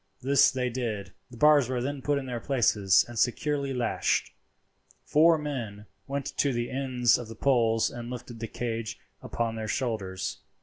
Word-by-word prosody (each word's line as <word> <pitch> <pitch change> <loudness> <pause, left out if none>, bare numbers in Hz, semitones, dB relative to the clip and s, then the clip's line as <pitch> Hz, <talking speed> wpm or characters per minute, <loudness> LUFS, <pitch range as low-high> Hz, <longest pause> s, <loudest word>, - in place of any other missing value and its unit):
This 140 +1 +5
they 130 -2 -1
did. 110 -6 -4 0.2
The 120 - -12
bars 150 -2 +5
were 130 -1 -1
then 135 +2 -3
put 145 +1 +1
in 140 - -4
their 125 -2 -4
places 105 -7 +3
and 120 -2 -5
securely 140 +3 0
lashed. 125 -2 0 0.7
Four 160 +2 +5
men 120 -9 -5 0.2
went 140 0 -4
to 140 - +3
the 120 0 -2
ends 130 -3 +2
of 120 - -7
the 115 - -9
poles 115 -3 +2
and 120 -1 -7
lifted 120 -1 -8
the 115 - -4
cage 115 -1 -4 0.2
upon 115 -1 -2
their 110 -1 -4
shoulders. 105 -6 -3
125 Hz, 170 wpm, -28 LUFS, 115-135 Hz, 0.7 s, This